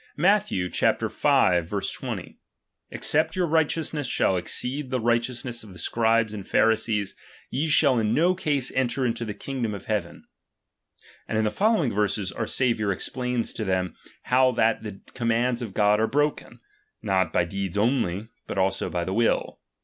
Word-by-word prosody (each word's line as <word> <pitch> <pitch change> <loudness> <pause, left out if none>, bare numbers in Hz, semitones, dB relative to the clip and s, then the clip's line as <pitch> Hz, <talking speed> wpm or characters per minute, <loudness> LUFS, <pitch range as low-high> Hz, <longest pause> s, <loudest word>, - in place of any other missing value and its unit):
Matth. 200 +6 +3
V. 90 -2 -1
20: 90 +1 0 0.5
Except 160 +2 +1
your 185 -1 +1
righteousness 160 -2 0
shall 95 - +1
exceed 125 +9 -3
the 130 -1 -1
righteousness 120 +1 -1
of 105 -4 -12
the - - -12
Scribes 115 0 +1
and 100 -2 -6
Pharisees, 110 -2 +1 0.4
ye 145 +5 0
shall 140 -4 +4
in 110 -1 +1
no 170 +9 +3
case 145 -7 -1
enter 130 0 0
into 120 0 -1
the 105 -2 -5
kingdom 120 -3 -3
of 100 - -9
heaven. 100 -6 -3 1.0
And - - -1
in 110 - +2
the 105 - +1
following 205 - +2
verses, 100 -2 0
our - - -4
Saviour 115 -5 +1
explains 125 +4 -2
to 110 - -4
them 95 -3 -1 0.3
how 130 +1 +3
that 115 -1 +2
the 105 -3 -8
commands 120 0 0
of 110 -5 -6
God 105 0 +3
are 110 - +2
broken, 145 +3 -1 0.4
not 95 -4 +1
by 85 - +2
deeds 95 +1 -4
only, 105 -3 0 0.2
but - - -5
also 95 0 0
by 85 -1 -2
the 95 - -3
will. 115 +2 0
115 Hz, 160 wpm, -25 LUFS, 100-130 Hz, 1.0 s, shall